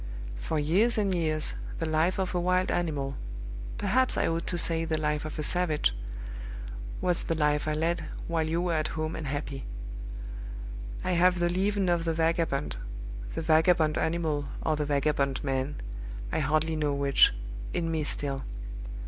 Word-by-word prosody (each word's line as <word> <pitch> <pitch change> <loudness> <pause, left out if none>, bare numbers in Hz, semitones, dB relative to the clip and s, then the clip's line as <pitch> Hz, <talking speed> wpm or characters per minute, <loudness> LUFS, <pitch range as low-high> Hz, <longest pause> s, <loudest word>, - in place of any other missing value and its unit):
For 155 - -1
years 190 +11 +3
and 200 -3 +2
years, 155 -3 0 0.2
the 165 - -1
life 160 +3 +2
of 190 -1 -1
a 180 - +2
wild 185 +1 +2
animal 145 -6 0 0.6
perhaps 260 0 +2
I - - +3
ought 165 +1 -1
to 175 - 0
say, 165 -1 +2
the 160 -1 0
life 150 0 0
of 155 - -5
a 155 - -1
savage 155 - +2 1.1
was 180 -2 +1
the 165 - -1
life 150 -1 +2
I 155 - +2
led, 165 +3 0 0.2
while 165 -1 +1
you 170 +2 +1
were 175 -2 +1
at 155 -1 +1
home 155 +1 -1
and 155 - -4
happy. 140 -1 -3 1.4
I 185 - 0
have 180 +1 +5
the 175 0 +2
leaven 195 +2 +1
of 170 -1 +2
the 165 - +2
vagabond 160 - +1 0.6
the - - -2
vagabond 160 -1 +4
animal, 160 -4 0 0.2
or 155 - +2
the 150 0 -1
vagabond 140 -2 +1
man, 135 +1 0 0.6
I - - +1
hardly 155 +2 +2
know 150 -2 +1
which 140 -1 +6 0.4
in 165 -1 0
me 160 -1 0
still. 140 -2 0
160 Hz, 165 wpm, -29 LUFS, 150-175 Hz, 1.4 s, which